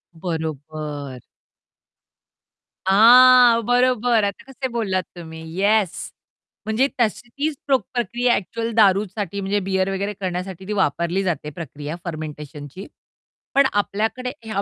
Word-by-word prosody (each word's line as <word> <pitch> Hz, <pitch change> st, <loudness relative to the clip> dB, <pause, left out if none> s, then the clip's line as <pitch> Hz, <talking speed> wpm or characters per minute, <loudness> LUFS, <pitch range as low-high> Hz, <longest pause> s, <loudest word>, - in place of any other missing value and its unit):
बरोबर. 155 Hz, -5 st, -5 dB, 1.7 s
हां, 240 Hz, +4 st, +7 dB
बरोबर. 245 Hz, -2 st, +2 dB
आता 200 Hz, +2 st, -3 dB
कसे 265 Hz, 0 st, -4 dB
बोललात 195 Hz, -6 st, -1 dB
तुम्ही, 160 Hz, -2 st, -9 dB, 0.2 s
येस. 205 Hz, -2 st, +1 dB, 0.5 s
म्हणजे 225 Hz, +5 st, +2 dB
तशी 235 Hz, +1 st, 0 dB
तीच 290 Hz, +4 st, -2 dB
प 275 Hz, -, +4 dB, 0.2 s
प्रक्रिया 240 Hz, 0 st, +1 dB
ॲक्चुअल 230 Hz, +5 st, -3 dB
दारूसाठी 200 Hz, -2 st, +2 dB
म्हणजे 200 Hz, +1 st, 0 dB
बिअर 190 Hz, 0 st, +1 dB
वगैरे 200 Hz, +2 st, -2 dB
करण्यासाठी 185 Hz, -1 st, -5 dB
ती 210 Hz, -, -2 dB
वापरली 170 Hz, +5 st, 0 dB
जाते 170 Hz, -5 st, -2 dB
प्रक्रिया 150 Hz, 0 st, -7 dB
फर्मेंटेशनची. 150 Hz, 0 st, -7 dB, 0.7 s
पण 275 Hz, 0 st, +6 dB
आपल्याकडे 220 Hz, +5 st, -1 dB
ह्या 215 Hz, -3 st, -2 dB
195 Hz, 110 wpm, -22 LUFS, 165-230 Hz, 1.7 s, हां